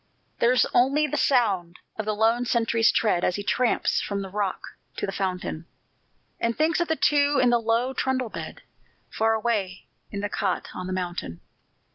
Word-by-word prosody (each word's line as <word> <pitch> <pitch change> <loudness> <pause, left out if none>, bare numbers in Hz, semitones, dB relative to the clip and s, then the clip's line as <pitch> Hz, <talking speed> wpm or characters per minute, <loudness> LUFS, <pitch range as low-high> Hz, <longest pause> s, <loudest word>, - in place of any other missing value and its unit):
There's 245 +1 +4
only 275 +5 +3
the 295 - -3
sound 195 -10 +1 0.2
of 220 - -4
the 215 0 -1
lone 225 +3 +2
sentry's 230 -1 +2
tread 195 -6 +1
As 180 - +1
he 205 - -4
tramps 215 +5 +1
from 200 -1 -3
the 190 - -7
rock 200 -2 -1 0.4
to - - -1
the 195 - -4
fountain, 180 -4 -3 0.7
And 230 0 -1
thinks 315 +3 +2
of 345 - 0
the 320 - +1
two 290 -1 +3
in 245 -1 +4
the 240 -1 +3
low 230 +3 +1
trundle 260 -2 -1
bed - - -8 0.5
Far 225 0 +1
away 210 -5 -2 0.2
in 200 - -5
the 205 - -1
cot 195 -2 -2
on 185 - -6
the - - -4
mountain. 175 - -4
225 Hz, 180 wpm, -25 LUFS, 195-250 Hz, 0.7 s, There's